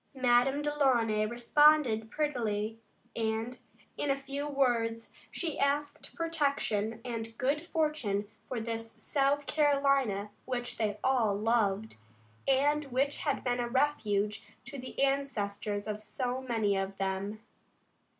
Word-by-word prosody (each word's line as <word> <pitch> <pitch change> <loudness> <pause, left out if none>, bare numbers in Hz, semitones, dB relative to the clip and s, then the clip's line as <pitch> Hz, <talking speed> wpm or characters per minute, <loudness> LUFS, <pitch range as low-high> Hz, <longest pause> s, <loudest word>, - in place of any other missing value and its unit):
Madame 260 +2 +3
Delaunay 245 -8 +2
responded 240 -1 +4
prettily, 225 -7 -1 0.4
and, 225 +2 -2 0.4
in 290 - -1
a 275 - +2
few 275 +1 -4
words, 235 -5 0 0.2
she 330 -4 -3
asked 290 +1 -1
protection 280 - 0
and 225 -2 -5
good 280 +4 +1
fortune 300 - 0 0.2
for 250 - -3
this 225 0 -4
South 280 0 0
Carolina 275 -9 +2
which 245 -1 -3
they 210 -2 0
all 240 -6 +3
loved, 215 - +1 0.5
and 290 +3 +3
which 275 +2 0
had 285 -3 -1
been 245 -1 0
a 240 - 0
refuge 215 -7 +1 0.2
to 275 +3 -8
the 255 - -8
ancestors 210 -7 -1
of 215 0 -4
so 250 +3 -3
many 225 -6 +1
of 195 0 -2
them. 195 +2 -2
245 Hz, 120 wpm, -31 LUFS, 220-280 Hz, 0.5 s, responded